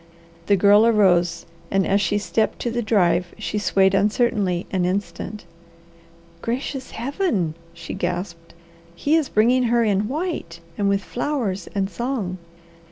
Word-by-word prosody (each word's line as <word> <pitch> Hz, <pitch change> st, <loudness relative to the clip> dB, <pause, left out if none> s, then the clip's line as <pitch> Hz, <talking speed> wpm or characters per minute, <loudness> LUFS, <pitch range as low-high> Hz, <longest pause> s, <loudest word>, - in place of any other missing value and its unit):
The 200 Hz, -, +5 dB
Girl 205 Hz, +2 st, +6 dB
arose 175 Hz, -6 st, +3 dB, 0.2 s
and 195 Hz, -1 st, +1 dB
as 200 Hz, +1 st, +2 dB
she 205 Hz, -, +1 dB
stepped 205 Hz, +2 st, 0 dB
to 240 Hz, -, -1 dB
the 240 Hz, +1 st, -1 dB
drive 185 Hz, -5 st, +1 dB
she 215 Hz, 0 st, -3 dB
swayed 195 Hz, -1 st, +3 dB
uncertainly 200 Hz, -3 st, +1 dB
an 185 Hz, -2 st, 0 dB
instant. 190 Hz, +2 st, -3 dB, 1.0 s
"Gracious 260 Hz, +2 st, -3 dB
Heaven!" 240 Hz, -, -1 dB, 0.2 s
she 165 Hz, -1 st, -8 dB
gasped. 175 Hz, -2 st, -4 dB, 0.4 s
"He 290 Hz, -, +1 dB
is 320 Hz, -4 st, +1 dB
bringing 245 Hz, +4 st, +3 dB
her 235 Hz, 0 st, +3 dB
in 205 Hz, -1 st, +1 dB
white, 285 Hz, -, -4 dB, 0.2 s
and 200 Hz, +1 st, 0 dB
with 200 Hz, 0 st, +1 dB
flowers 240 Hz, -, -2 dB
and 195 Hz, -1 st, +1 dB
song!" 215 Hz, -5 st, -3 dB
205 Hz, 140 wpm, -22 LUFS, 180-235 Hz, 1.0 s, Girl